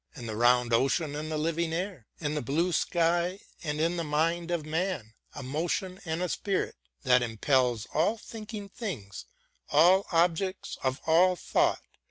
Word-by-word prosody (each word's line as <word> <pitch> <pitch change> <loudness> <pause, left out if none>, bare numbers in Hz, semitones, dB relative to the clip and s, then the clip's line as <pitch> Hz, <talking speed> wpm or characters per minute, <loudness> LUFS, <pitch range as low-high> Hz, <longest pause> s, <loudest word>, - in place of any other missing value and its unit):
And 120 -5 -7
the 110 - -4
round 120 +1 +3
Ocean 140 +5 +2
and 155 +1 -4
the 155 - -1
living 165 +1 0
air, 175 - -4
And 150 -1 -2
the 150 - -1
blue 165 +9 0
sky, 175 +3 +1 0.2
and 150 -2 -2
in 165 +2 +1
the 170 - -1
mind 165 +3 0
of 170 -3 -1
man: 155 - -2 0.2
A 140 - -6
motion 175 +7 -2
and 165 +2 -2
a 180 - -1
spirit, 195 +2 -1 0.3
that 125 -2 +5
impels 120 0 +1
All 175 +9 +2
thinking 215 -2 -8
things, 155 - -6 0.4
all 180 +6 +5
objects 175 +3 0
of 130 0 -1
all 180 +3 +5
thought. - - +1
160 Hz, 165 wpm, -29 LUFS, 135-180 Hz, 0.4 s, that